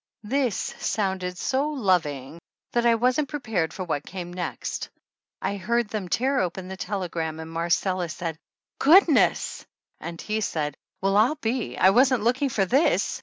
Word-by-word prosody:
This 250 -1 0 0.2
sounded 190 -3 -1
so 270 +7 0
loving 170 - 0 0.3
that 240 0 +2
I 230 - +5
wasn't 255 +5 +1
prepared 220 - -1
for 190 - -5
what 145 -5 -2
came 175 -1 -7
next. 180 -1 -4 0.5
I 200 - -1
heard 235 +3 0
them 200 -4 -4
tear 265 +7 +1
open 185 +1 -2
the 190 - -5
telegram 175 -5 -3
and 160 0 -7
Marcella 170 +2 0
said, 160 0 -5 0.4
"Good 350 +8 +7
ness;" 295 -6 +2 0.4
and 170 -1 -7
he 215 0 -2
said, 150 -7 -1 0.3
"Well, 195 +1 +1
I'll 235 +8 +4
be 245 -4 -2
I 190 - +6
wasn't 250 0 +4
looking 255 +4 +2
for 200 -6 +1
this 270 - +2
195 Hz, 160 wpm, -25 LUFS, 175-245 Hz, 0.5 s, Good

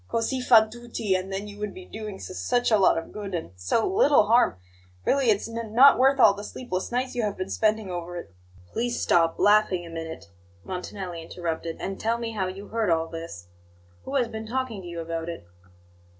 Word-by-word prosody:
'Cosi 255 +3 -1
fan 220 -3 +6
tutti;' 235 -3 -3
and 185 +1 -2
then 195 +2 -4
you 205 0 -10
would 210 -1 -4
be 370 0 -10
doing 215 - -7
s 185 - -8
such 245 -1 +1
a 215 - +6
lot 190 - +5
of 165 - -5
good, 200 -3 -5
and 160 - -5
so 90 - 0
l 375 - -1
little 295 - +5
harm! 230 - +3 0.5
Really, 270 -3 +3
it's 205 0 +2
n 230 -1 -6
not 275 +3 +8
worth 270 +1 +4
all 205 - +7
the 205 +1 -8
sleepless 205 -4 -4
nights 250 +1 -1
you 245 - -1
have 210 -2 -2
been 185 +1 -4
spending 215 -3 +1
over 175 0 -5
it!" 135 - -9 0.4
"Please 240 +1 -1
stop 165 -1 +3
laughing 205 -4 +3
a 165 - -10
minute," 160 -11 -7 0.3
Montanelli 180 - -6
interrupted, 165 -1 -4
"and 195 0 -4
tell 230 +1 0
me 230 -1 -4
how 195 -4 -2
you 195 +2 -8
heard 225 -3 0
all 165 -1 +1
this. 165 - -8 0.6
Who 275 - -4
has 250 -4 +2
been 220 0 -7
talking 245 -4 -3
to 180 - -10
you 170 -1 -5
about 165 0 -4
it?" 165 - -7
205 Hz, 215 wpm, -26 LUFS, 175-230 Hz, 0.6 s, not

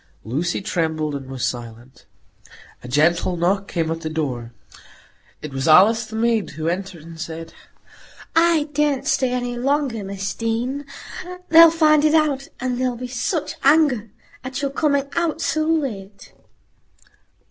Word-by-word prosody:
Lucy 160 - -2
trembled 160 -4 -1
and 135 -2 -6
was 130 -2 -3
silent. 120 +1 -7 0.8
A - - -8
gentle 165 +6 +2
knock 195 +4 0
came 165 -2 -2
at 165 0 -4
the 160 - -4
door. 130 -7 -3 0.9
It 150 -3 -7
was 135 +2 -2
Alice, 215 +8 +6
the 220 - -8
maid, 225 -2 +1
who 160 0 -3
entered 180 -1 -3
and 165 0 -10
said,— 165 0 -7 0.8
"I 330 -2 +4
daren't 290 -2 +1
stay 260 -2 +1
any 245 -1 -2
longer, 270 -4 0
Miss 195 0 -4
Deane. 245 +5 -2 0.6
They'll 330 0 +9
find 310 -2 +4
it 310 +1 +4
out, 290 -3 +1
and 250 -1 -2
there'll 255 -1 0
be 250 - -6
such 255 +6 -2
anger 275 -7 +3 0.3
at 260 +2 -5
your 275 - 0
coming 280 -1 +1
out 335 -2 0
so 310 0 0
late." 220 -12 -3
225 Hz, 145 wpm, -21 LUFS, -, 0.9 s, They'll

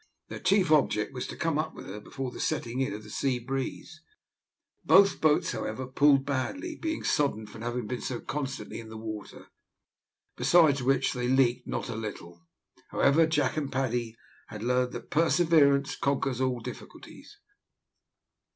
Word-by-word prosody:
Their - - -6
chief 190 -5 +2
object 135 -6 +2
was 125 - -4
to - - -7
come 165 -3 0
up 155 0 -3
with - - -9
her 100 +3 -7
before 130 +4 -6
the - - -10
setting 120 +2 -2
in 130 - 0
of 105 +1 -7
the 105 - -12
sea 130 +1 0
breeze. 135 +6 -5 0.8
Both 195 0 +5
boats, 155 -1 +3
however, 130 - -4
pulled 135 +1 +3
badly, 280 - -3
being 320 0 -3
soddened 110 -7 0
from 110 - -10
having 120 0 -3
been 125 +3 -4
so 125 -2 -3
constantly 140 -2 -5
in 115 -1 -10
the 110 - -8
water, 110 -1 -8 0.9
besides 140 +1 +4
which 135 +1 +2
they 125 -2 -2
leaked 125 -1 +2
not - - -3
a - - -5
little. 85 -6 -7 0.5
However, 155 +4 +4
Jack 150 -3 0
and 145 -3 -2
Paddy 120 -4 -1 0.3
had 105 -1 -8
learned 125 +1 +1
that 120 - -8
perseverance 155 -4 +3
conquers 135 -2 -1
all 130 -2 0
difficulties. - - -11
130 Hz, 160 wpm, -28 LUFS, 120-150 Hz, 0.9 s, Both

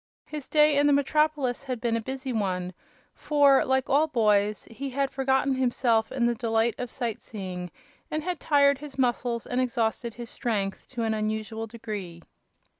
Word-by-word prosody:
His 300 -3 -7
day 300 -1 +4
in 290 - +4
the 290 - +5
metropolis 285 -2 +1
had 255 -3 -4
been 230 0 0
a 230 - -1
busy 265 +2 -4
one, 185 -4 -1 0.4
for, 285 -3 +4
like 265 0 +1
all 295 +3 +3
boys, 210 -6 +2
he 270 +4 -5
had 275 +1 -1
forgotten 265 0 +1
himself 245 -3 +1
in 250 -3 0
the 240 - +3
delight 225 -1 +1
of 250 -1 -3
sight 235 -4 -3
seeing 185 -4 -6 0.4
and 310 0 -2
had 360 -1 -3
tired 280 -2 +4
his 290 -2 -9
muscles 240 -2 0
and 250 +1 0
exhausted 235 -1 -1
his 240 -1 -8
strength 205 -6 -2
to 240 -3 -4
an 220 -1 +1
unusual 220 +1 -3
degree. 205 -7 -7
245 Hz, 175 wpm, -27 LUFS, 220-275 Hz, 0.4 s, the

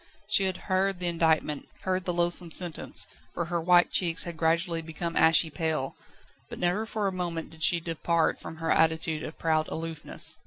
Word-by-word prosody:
She 205 -2 +3
had 185 -1 -1
heard 190 0 +1
the 180 - -3
indictment, 160 -4 +1
heard 185 0 -1
the 180 - +1
loathsome 175 0 +3
sentence, 170 0 +1 0.3
for 170 - -2
her 170 0 -2
white 175 +1 +4
cheeks 170 -3 +1
had 170 -1 -6
gradually 165 +1 0
become 165 +1 -5
ashy 160 0 +4
pale, 160 -4 -2 0.5
but - - -8
never 180 +5 0
for 215 -2 -2
a - - 0
moment 170 -3 -4
did 160 -1 -13
she 170 +1 +5
depart 165 0 0
from - - -8
her 165 0 -2
attitude 160 -1 +2
of 155 - -7
proud 155 -1 +1
aloofness. 160 -1 -1
170 Hz, 185 wpm, -27 LUFS, 160-180 Hz, 0.5 s, she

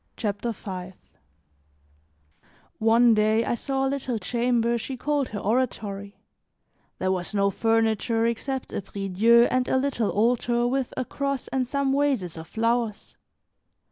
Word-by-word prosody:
CHAPTER 210 +1 -2
V 185 -3 -7 1.9
ONE 230 +1 +5
day, 215 +1 +2
I - - 0
saw 270 +3 -1
a - - +2
little 265 -3 -2
chamber 235 +1 +1
she 260 +3 -5
called 290 0 -1
her 205 - -5
oratory; 205 -3 -2 0.8
there 185 - 0
was 185 +2 -3
no 200 0 +2
furniture 225 +1 +1
except 260 +3 -3
a - - -2
priedieu 200 +4 +3
and 255 -1 +1
a - - +2
little 260 -5 0
altar 240 +4 +1
with 260 +1 -1
a 255 - -1
cross 275 -1 -3
and 260 -2 -1
some 280 +1 0
vases 270 - 0
of 160 0 -9
flowers. 230 +1 -1
235 Hz, 140 wpm, -25 LUFS, 210-255 Hz, 1.9 s, ONE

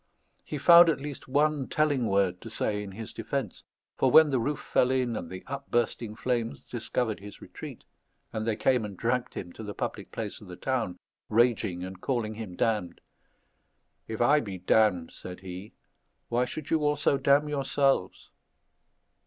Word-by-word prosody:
He 150 - -5
found 170 +4 +8
at 155 - +1
least 145 -1 -7
one 145 0 +1
telling 145 -6 +1
word 95 -3 +1
to 115 - -8
say 105 -1 -1
in 100 -2 -7
his 110 +2 -7
defence; 115 -1 -3 0.4
for - - +4
when 160 -2 +7
the 130 - +2
roof 145 +5 -1
fell 125 - +2
in 130 -3 +1
and 85 - -5
the 95 0 -8
upbursting 120 -5 -2
flames 120 -1 -2
discovered 115 -1 -2
his 100 +1 -11
retreat, - - -9 0.5
and 110 0 -3
they 110 - +1
came 125 +2 +2
and 100 -3 -6
dragged 120 +3 -1
him 90 -1 -6
to - - -10
the 105 -2 -6
public - - -4
place 110 -2 -5
of 105 - -12
the 90 - -8
town, 115 -6 -2 0.3
raging 110 -6 +2
and 95 0 -8
calling 120 -5 -1
him 105 -5 -7
damned 105 -5 0 1.1
"If 110 0 -4
I 145 +5 +5
be 100 -8 -5
damned," 90 -2 +2
said 90 0 -9
he, 95 +3 -8 0.5
"why 120 +1 +2
should 150 +3 -7
you 160 - +4
also 145 -1 +2
damn 140 +2 +4
yourselves?" 140 -7 0
115 Hz, 170 wpm, -28 LUFS, 100-135 Hz, 1.1 s, found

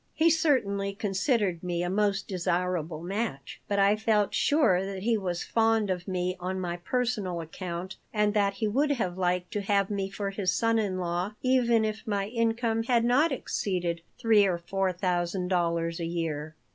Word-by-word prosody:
He 330 +1 +4
certainly 200 - +1
considered 200 - 0
me 175 -1 -2
a - - -1
most 200 -1 +1
desirable 175 -3 -1
match. 190 - -4
But 205 - 0
I 200 +1 +5
felt 215 -2 +1
sure 240 - +3
that 195 -1 -5
he 230 +1 +2
was 180 -5 -2
fond 225 -3 +2
of 180 0 -3
me 180 -1 -1
on 185 +1 -3
my 175 -1 -3
personal 210 -4 -1
account 175 +2 -6
and 210 -1 +1
that 200 -2 +2
he 220 - -1
would 285 +7 +2
have 185 -9 -2
liked 180 -1 -1
to 205 - -1
have 200 0 +1
me 195 -1 -2
for 195 0 -4
his 195 -2 0
son 230 +4 +2
in 195 -4 -1
law 180 +3 -2
even 240 -3 +3
if 215 +1 -4
my 200 -2 0
income 230 0 0
had 235 0 +2
not 285 +7 +3
exceeded 180 -9 -2 0.2
three 215 -3 +4
or 180 -2 0
four 190 +2 -1
thousand 180 0 -1
dollars 170 -2 0
a 170 - -2
year. 160 -2 -3
195 Hz, 180 wpm, -28 LUFS, 180-220 Hz, 0.2 s, I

